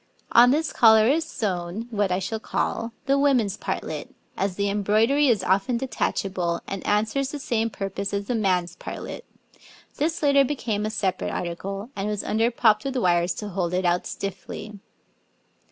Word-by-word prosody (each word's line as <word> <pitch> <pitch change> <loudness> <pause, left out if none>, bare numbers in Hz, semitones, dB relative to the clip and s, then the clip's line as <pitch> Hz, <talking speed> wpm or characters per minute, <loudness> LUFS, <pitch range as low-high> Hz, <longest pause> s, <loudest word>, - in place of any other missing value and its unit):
On 245 +1 +7
this 305 +4 +1
collar 220 -2 +6
is 315 +5 +2
sewn 195 - -3
what 205 -3 0
I 180 - +2
shall 195 +4 -3
call 230 +1 -2
the 275 +1 +3
woman's 250 -9 +2
partlet, - - -4 0.3
as 195 -1 -1
the 200 +1 0
embroidery 215 +8 +3
is 220 -7 +2
often 195 +7 +1
detachable 195 -8 -1
and 195 -1 -5
answers 220 +6 +1
the 295 - -5
same 230 -4 -1
purpose 195 -1 -4
as 200 0 -2
the 245 - -2
man's 180 -5 0
partlet; 485 - -7 0.7
this 315 +2 -1
later 280 -1 +5
became 225 -7 -2
a - - -1
separate 195 -4 -1
article, 195 +6 -4
and 195 +1 -2
was 210 -1 -2
under 225 +2 +1
propped 220 -3 +3
with 270 -1 -2
wires 175 -4 +2
to 210 - -5
hold 180 -2 -1
it 185 0 0
out 175 0 +1
stiffly. 200 +2 -6
210 Hz, 170 wpm, -25 LUFS, 190-245 Hz, 0.7 s, On